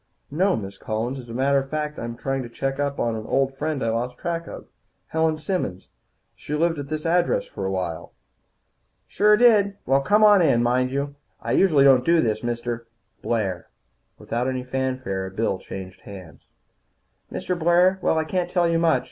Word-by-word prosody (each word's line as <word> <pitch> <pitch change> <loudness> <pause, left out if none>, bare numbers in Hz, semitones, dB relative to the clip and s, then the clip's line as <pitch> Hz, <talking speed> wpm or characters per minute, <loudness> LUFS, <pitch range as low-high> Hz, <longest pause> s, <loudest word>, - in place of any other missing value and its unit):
"No, 185 +6 +2
Miss 100 -2 -7
Collins. 115 +5 -3
As 120 -2 -11
a - - -7
matter 140 +2 +3
of 135 0 -6
fact, 150 0 -3
I'm 115 0 -5
trying 135 +1 -2
to 120 - -7
check 135 +3 -3
up 140 -1 -1
on 115 -1 0
an 110 0 -6
old 135 0 +1
friend 150 -1 -2
I 115 - 0
lost 120 +2 -2
track 170 -1 -3
of. - - -9 0.4
Helen 160 -1 +1
Simmons. 155 - -3 0.5
She 150 - -5
lived 165 0 +1
at 140 - -5
this 155 0 -4
address 175 +1 +2
for 95 - -5
a - - -2
while." 90 -4 -4 1.0
"Sure 210 +1 +4
did. 210 -4 +4
Well, 135 +1 +3
come 205 +9 +3
on 205 -2 +7
in. 120 -8 +3
Mind 125 +1 +2
you, 140 +2 -3 0.3
I - - -4
don't - - +3
usually 140 -8 +6
do 165 +6 +3
this, 110 -5 0
Mr. 120 0 -3 0.2
" - - -45
"Blair." 100 -7 -2 0.5
Without 120 +2 -3
any 130 -1 -2
fanfare 130 -7 -3
a - - -6
bill 95 -1 -1
changed 95 0 -9
hands. 90 -6 -12 0.8
"Mr. 180 - -2
Blair. 175 +3 +3
Well, 160 - +1
I 160 - +2
can't 180 +2 -2
tell 175 -2 +2
you 165 0 +1
much. 165 -1 +3
135 Hz, 195 wpm, -23 LUFS, 115-165 Hz, 1.0 s, on